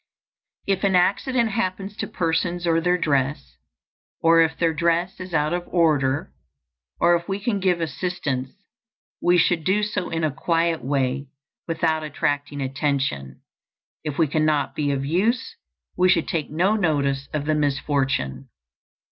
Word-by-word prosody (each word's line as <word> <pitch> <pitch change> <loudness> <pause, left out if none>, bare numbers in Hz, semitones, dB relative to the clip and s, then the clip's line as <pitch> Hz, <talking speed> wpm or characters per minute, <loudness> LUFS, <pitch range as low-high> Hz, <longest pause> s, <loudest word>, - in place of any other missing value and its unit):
If 195 -1 0
an 195 -2 +3
accident 225 +6 +2
happens 195 +1 -2
to - - -3
persons 170 +1 -1
or 165 -1 +2
their 180 +1 +2
dress, 140 - -1 0.6
or 165 0 +5
if 160 0 +1
their 165 -1 +1
dress 170 +4 0
is 185 0 -7
out 150 0 +1
of 175 0 -3
order, 145 - +1 0.7
if 170 +1 +2
we 195 +1 -1
can 205 -1 -1
give 185 -2 +1
assistance 155 -6 -2 0.7
we 175 0 +4
should 170 -1 +2
do 200 +5 +2
so 210 -4 -2
in 165 0 -2
a 155 - +1
quiet 165 -2 0
way 135 0 -1 0.4
without 160 -1 0
attracting 145 -1 -2
attention; 135 - -2 0.6
if 150 -3 -4
we 165 - +4
cannot 155 -1 +1
be 145 -1 0
of 135 -1 -2
use, 225 - 0 0.4
we 185 0 +3
should - - +3
take 160 -3 -2
no 180 +8 +2
notice 140 -8 0
of 150 -1 -2
the 155 - +1
misfortune. 135 - -1
165 Hz, 145 wpm, -23 LUFS, 145-180 Hz, 0.7 s, or